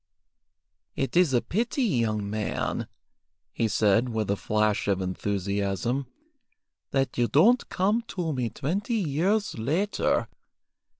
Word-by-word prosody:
"It 135 - -2
is 175 -4 +5
a 120 -2 +2
pity, 240 - -1
young 115 - 0
man," 105 +1 -2 0.7
he 115 - +1
said, 110 +3 +2
with 110 -3 -1
a - - +2
flash 105 0 0
of 100 -2 +1
enthusiasm, 100 +6 -2 0.8
"that 135 -2 -1
you 120 - +3
don't 220 - +4
come 205 +5 +1
to 170 -4 -2
me 125 -3 -1
twenty 200 - -2
years 190 - 0
later. 165 - 0
125 Hz, 120 wpm, -27 LUFS, -, 0.8 s, is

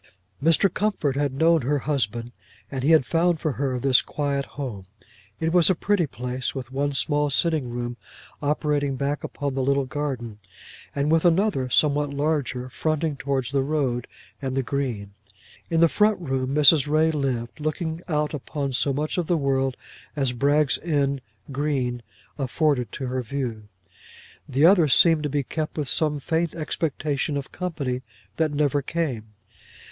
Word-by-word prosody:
Mr. 165 +4 +5
Comfort 190 -10 0
had 145 -1 0
known 160 +4 +3
her 145 +4 +1
husband, 120 -5 -2 0.4
and 135 -2 -3
he 140 - +1
had 160 -5 +6
found 170 +1 +2
for 155 - -1
her 130 -1 -1
this 130 0 +4
quiet 140 -2 -2
home. 110 -10 -5 0.5
It 160 +1 0
was 175 -1 +5
a 185 - +3
pretty 190 -2 +1
place, 125 +1 -4
with 130 -2 -6
one 140 +2 -1
small 145 +3 +1
sitting 155 -2 +1
room 120 0 -4 0.4
opening 145 -1 0
back 140 +2 -2
upon 140 -1 -3
the 135 - -1
little 140 +1 +2
garden, 130 -6 -4 0.6
and 145 +2 +1
with 165 0 +3
another 175 -6 +2
somewhat 145 +1 +2
larger 140 -3 -1
fronting 155 +2 -1
towards 135 -2 -2
the 140 -1 +2
road 135 -4 -1 0.3
and 135 -1 -3
the 135 - +1
green. 120 -7 -3 0.6
In 165 -1 +2
the 170 - +7
front 210 +4 +2
room 135 -4 -2
Mrs. 150 -1 +6
Ray 155 +2 +3
lived, 130 -5 -2
looking 160 +2 -3
out 150 -2 0
upon 140 -1 -3
so 140 +2 +1
much 150 +5 -1
of 170 - -2
the 175 - +2
world 135 -2 0 0.4
as 135 -4 0
Bragg's 140 +2 +2
End 140 -4 0 0.3
green 135 -4 -1 0.4
afforded 135 -1 0
to 135 - -4
her 130 0 -2
view. 120 -4 -4 0.8
The 140 +3 +3
other 175 -3 +6
seemed 160 +3 +5
to 150 - -2
be 145 0 0
kept 155 +4 -4
with 150 -3 -1
some 150 -1 +2
faint 165 +3 -1
expectation 150 -2 -2
of 140 - -6
company 145 -9 -3 0.4
that 160 -1 +2
never 145 -1 +1
came. 130 -9 -3
140 Hz, 160 wpm, -24 LUFS, 130-155 Hz, 0.8 s, the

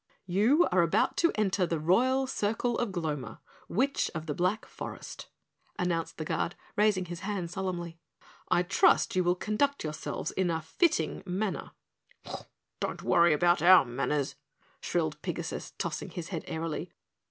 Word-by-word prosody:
"You 215 - +4
are 180 -1 +4
about 165 -1 +2
to 335 - +4
enter 195 -3 +1
the 165 -2 -1
Royal 255 - +3
Circle 235 -1 -1
of 240 - 0
Gloma, 155 -7 -4 0.3
Witch 270 +8 +1
of 160 0 -4
the 150 - -2
Black 185 +8 0
Forest," - - -8 0.5
announced 170 -2 -1
the 155 - -4
Guard, 165 - -1 0.2
raising 205 -3 +3
his 175 -1 -6
hand 195 -3 -3
solemnly. 175 -3 -4 0.5
"I 175 - +3
trust 185 +1 +3
you 185 - +3
will 175 0 +2
conduct 275 +9 0
yourselves 150 -1 -4
in 190 -2 0
a 165 -1 0
fitting 160 - 0
manner." 190 +2 -2 1.1
"Don't - - -3
worry 170 0 +5
about 175 +2 +3
OUR 180 -2 +8
manners," 135 +3 -1 0.5
shrilled - - -1
Pigasus, - - -4
tossing - - -3
his 170 -1 -6
head 170 -5 -4
airily. 160 -1 -3
180 Hz, 150 wpm, -29 LUFS, 165-210 Hz, 1.1 s, OUR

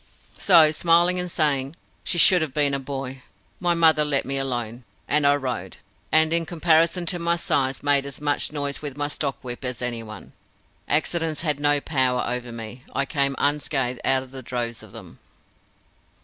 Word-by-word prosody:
So, 165 -5 +6
smiling 170 +3 +3
and 180 0 -3
saying, 145 -3 0 0.3
"She 175 - -1
should 180 +1 +6
have 155 -4 -3
been 145 -2 +2
a 140 - 0
boy," 135 -1 -6 0.4
my 175 -1 +1
mother 160 -2 +4
let 145 -2 +2
me 135 +1 -1
alone, 120 -2 -3 0.2
and 150 -1 +2
I 145 - +5
rode, 130 -5 -5 0.3
and 160 +1 +4
in 170 0 +2
comparison 170 +1 +2
to 175 0 -1
my 170 0 +1
size 135 -6 -1
made 140 -1 +2
as 140 - -6
much 145 0 -1
noise 145 -2 -3
with 145 -2 -6
my 145 0 -1
stock 145 -2 -3
whip 120 +1 -7
as 125 -2 -4
any 120 -2 -3
one. 110 -2 -11 0.5
Accidents 155 +1 0
had 150 -3 -1
no 145 0 +3
power 130 -4 0
over 125 0 -4
me, 115 +2 -9
I 140 - 0
came 140 -1 -1
unscathed 135 -4 -1
out 130 0 +1
of 130 0 -11
droves 120 -1 -4
of - - -14
them. - - -12
140 Hz, 180 wpm, -23 LUFS, 130-160 Hz, 0.5 s, So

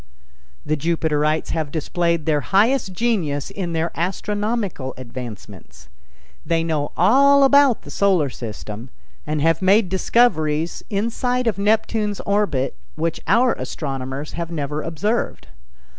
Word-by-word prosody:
The 155 - +1
Jupiterites 155 -1 0
have 155 -3 -2
displayed 170 +1 -1
their 150 -2 +2
highest 205 - +2
genius 180 - -1
in 185 -4 -4
their 165 +1 -1
astronomical 200 - -2
advancements. 105 - -10 0.5
They 165 -1 0
know 155 -3 -1
all 275 +9 +5
about 275 -3 +5
the - - -10
Solar 185 -9 +2
System, 110 0 -7 0.4
and 150 -1 -1
have 165 +1 +2
made 195 +1 +4
discoveries 170 -6 +1
inside 245 +4 -1
of 215 -4 0
Neptune's 210 0 +1
orbit 200 - 0 0.2
which 165 +1 -2
our 235 +4 +4
astronomers 135 0 -5
have 170 0 -4
never 150 -2 -3
observed. 165 - -2
170 Hz, 120 wpm, -21 LUFS, 150-210 Hz, 0.5 s, all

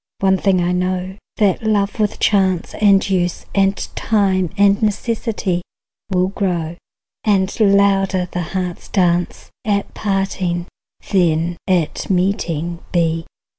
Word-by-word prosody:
One 190 -1 +3
thing 190 -3 +2
I 175 - +1
know, 180 +1 -1 0.2
that 200 -4 +2
love 210 -1 0
with 210 0 0
chance 190 -4 +2
And 200 -2 +5
use 180 -3 -1
and 195 0 +2 0.2
time 190 -5 +1
and 200 0 +4
necessity 210 -4 -1 0.5
Will 185 -1 +1
grow, 175 -5 -2 0.5
and 195 -3 +1
louder 195 -2 +3
the 180 - -2 0.2
heart's 180 -2 -4
dance 175 -3 0
At 200 -2 -1
parting 195 -3 -1 0.5
than 170 -2 +2
at 180 -5 0
meeting 175 -3 0
be. 165 -1 0
190 Hz, 120 wpm, -19 LUFS, 175-200 Hz, 0.5 s, And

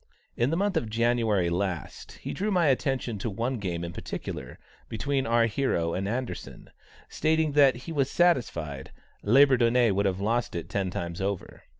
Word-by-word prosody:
In 120 +2 +1
the 165 - 0
month 200 -1 +1
of 115 -8 -1
January 115 -5 +1
last, 90 -3 -3
he - - -7
drew 205 +3 -2
my 180 -4 +2
attention 130 -4 -1
to 115 - -2
one 115 +5 -2
game 85 -4 -3
in 85 0 -5
particular, - - -6 0.3
between 135 +3 -1
our 115 0 +4
hero 105 -9 0
and 95 +1 -2
Anderssen, 125 +4 -5 0.4
stating 160 0 +1
that 140 -2 +5
he 165 - -6
was 140 -4 0
satisfied 85 - 0 0.3
"Labourdonnais 120 -1 +4
would 100 +1 +1
have 95 -1 -1
lost 115 +2 -1
it 85 - -5
ten 95 -2 -1
times 85 0 -5
over." 100 -1 -4
115 Hz, 170 wpm, -27 LUFS, 95-135 Hz, 0.4 s, that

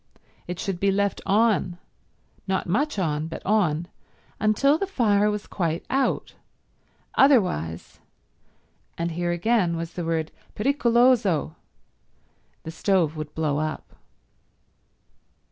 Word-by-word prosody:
It 180 0 -4
should 190 -3 -3
be 200 - +2
left 200 +1 0
on—not 195 -2 -2
much 280 - 0
on, 155 -4 -1
but 165 - -8
on—until 215 - 0
the 395 - -1
fire 210 - +2
was 210 -1 -3
quite 170 -2 -2
out; 270 +1 0 0.8
otherwise, 180 - +2 1.0
and 170 0 -2
here 175 +1 -2
again 175 -1 +1
was 165 0 -5
the 175 - -4
word 165 -1 -2 0.2
pericoloso, 235 - +2 1.1
the 160 - -6
stove 165 -2 +1
would 155 -1 -7
blow 150 -2 0
up. 155 0 -5
185 Hz, 105 wpm, -24 LUFS, 165-220 Hz, 1.1 s, be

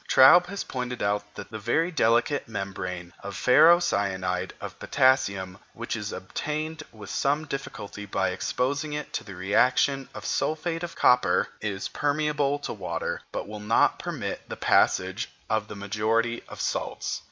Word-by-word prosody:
Traube 135 +7 +8
has 200 +1 -4
pointed 125 -1 -4
out 105 0 -1
that - - -9
the 110 - -5
very 160 - +1
delicate 120 0 +2
membrane 95 -4 -5
of 100 0 -7
ferrocyanide 100 - +3
of - - -8
potassium 100 -9 +2
which 120 +1 -4
is 105 -2 -4
obtained 155 +11 -4
with 105 -3 -10
some 145 +3 +1
difficulty 105 -8 -6
by 95 -1 0
exposing 140 +10 -1
it 150 0 -5
to - - -2
the 100 - -10
reaction 125 +8 +2
of - - -7
sulphate 165 +2 -1
of 175 -1 -5
copper, 125 0 +4
is 100 -2 -3
permeable 145 -1 0
to 145 - -5
water, 85 -4 -3
but - - -4
will 105 0 -7
not 105 +2 +2
permit - - -4
the - - -5
passage 95 +5 +2 0.2
of 110 -1 +1
the - - -8
majority 110 +4 0
of - - -9
salts. - - -2
115 Hz, 150 wpm, -26 LUFS, 100-145 Hz, 0.2 s, Traube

